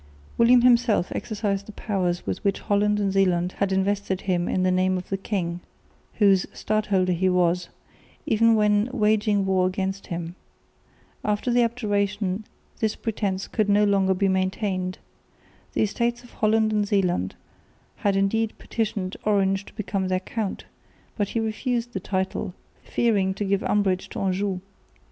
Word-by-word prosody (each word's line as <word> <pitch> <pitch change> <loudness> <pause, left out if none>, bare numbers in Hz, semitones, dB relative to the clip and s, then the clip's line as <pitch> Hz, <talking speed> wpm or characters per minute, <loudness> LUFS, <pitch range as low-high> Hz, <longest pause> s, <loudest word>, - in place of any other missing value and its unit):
William 240 +1 +6
himself 240 -6 +4
exercised 200 -3 -2
the - - -7
powers 185 -4 -2
with - - -3
which 200 -1 0
Holland 210 0 +1
and 200 -2 0
Zeeland 180 -2 +2
had 200 -1 +1
invested 190 0 0
him 175 -2 0
in 185 - +1
the 185 - +3
name 185 0 +2
of 180 - -7
the 195 - 0
king, 185 -3 -3 0.6
whose 195 -3 +4
stadholder 205 -4 0
he 185 +2 +1
was, 180 -1 +1 0.6
even 230 +1 +4
when 210 +1 +3
waging 210 -4 +2
war 185 -1 +2
against 190 +1 -3
him. 170 0 -4 0.9
After 210 +4 0
the 240 0 +4
Abjuration 210 -3 -1 0.3
this 220 -1 0
pretence 200 -4 -2
could 215 -3 0
no 205 +1 +4
longer 195 -2 +3
be 195 +2 +1
maintained. 185 -1 -1 0.8
The - - +2
Estates 235 +3 -1
of 245 - -16
Holland 220 0 +2
and 210 -1 +1
Zeeland 180 - 0 0.6
had 200 -1 +1
indeed 215 +3 +1
petitioned 205 -4 -3
Orange 195 -2 +1
to - - -14
become 195 -3 -2
their 185 0 +1
count, 215 0 -4 0.5
but 205 -2 -1
he 230 - -1
refused 235 +2 -2
the 190 - -2
title, 190 -1 -3 0.3
fearing 200 -5 +1
to 205 - -2
give 200 0 +1
umbrage 195 -3 +1
to - - -6
Anjou. 190 0 -1
200 Hz, 155 wpm, -25 LUFS, 185-215 Hz, 0.9 s, William